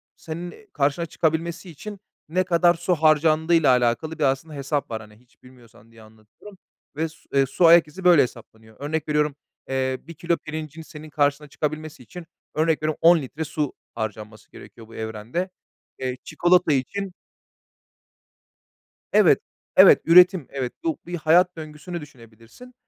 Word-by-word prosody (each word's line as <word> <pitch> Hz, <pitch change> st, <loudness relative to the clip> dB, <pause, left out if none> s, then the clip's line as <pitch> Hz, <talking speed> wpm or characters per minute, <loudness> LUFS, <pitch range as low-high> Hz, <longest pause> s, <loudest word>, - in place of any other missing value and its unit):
senin 175 Hz, +6 st, -9 dB
karşına 145 Hz, +3 st, 0 dB
çıkabilmesi 170 Hz, +3 st, -2 dB
için 200 Hz, +6 st, -9 dB, 0.3 s
ne 185 Hz, +3 st, +1 dB
kadar 175 Hz, 0 st, +3 dB
su 175 Hz, +1 st, -1 dB
harcandığıyla 155 Hz, +1 st, +3 dB
alakalı 125 Hz, +7 st, 0 dB
bir -, -, 0 dB
aslında 135 Hz, +3 st, 0 dB
hesap 140 Hz, -1 st, -3 dB
var. 110 Hz, 0 st, -4 dB
Hani, 105 Hz, 0 st, -15 dB
hiç 125 Hz, +1 st, -30 dB
bilmiyorsan 120 Hz, -3 st, -19 dB
diye 115 Hz, -1 st, -17 dB
anlatıyorum. 110 Hz, -, -17 dB, 0.4 s
Ve 160 Hz, +1 st, -2 dB
s 160 Hz, -, -18 dB
su -, -, -27 dB
eee, 135 Hz, -, +4 dB
su 170 Hz, +6 st, +1 dB
ayak 165 Hz, -1 st, +7 dB
izi 185 Hz, +5 st, -11 dB
böyle 175 Hz, -4 st, +6 dB
hesaplanıyor. 110 Hz, -3 st, -7 dB
Örnek 155 Hz, +2 st, -3 dB
veriyorum, 150 Hz, -1 st, +1 dB, 0.3 s
eee, 130 Hz, -1 st, -1 dB
1 170 Hz, -, -11 dB
kilo 170 Hz, +1 st, -1 dB
pirincin 155 Hz, +1 st, -7 dB
senin 155 Hz, -1 st, -11 dB
karşına 145 Hz, 0 st, 0 dB
çıkabilmesi 155 Hz, -2 st, -5 dB
için, 175 Hz, +7 st, -11 dB, 0.3 s
örnek 155 Hz, 0 st, +1 dB
veriyorum 155 Hz, 0 st, -1 dB
10 170 Hz, +1 st, +7 dB
litre 145 Hz, +4 st, -6 dB
su 150 Hz, -2 st, -3 dB, 0.2 s
harcanması 110 Hz, -1 st, -7 dB
gerekiyor 115 Hz, -2 st, -14 dB
bu 115 Hz, -, -14 dB
evrende. 110 Hz, -, -4 dB, 0.5 s
Eee, 130 Hz, -1 st, -3 dB
çikolata 175 Hz, -2 st, +2 dB
için 190 Hz, +8 st, -3 dB, 2.0 s
Evet, -, -, +5 dB, 0.4 s
evet. -, -, +8 dB
Üretim, 180 Hz, -2 st, +6 dB
evet. 130 Hz, -3 st, -4 dB
Bu 330 Hz, -2 st, -1 dB
bir 175 Hz, 0 st, -5 dB
hayat 175 Hz, +3 st, +3 dB
döngüsünü 155 Hz, +2 st, -7 dB
düşünebilirsin. 120 Hz, -, -15 dB
155 Hz, 150 wpm, -23 LUFS, 130-170 Hz, 2.0 s, evet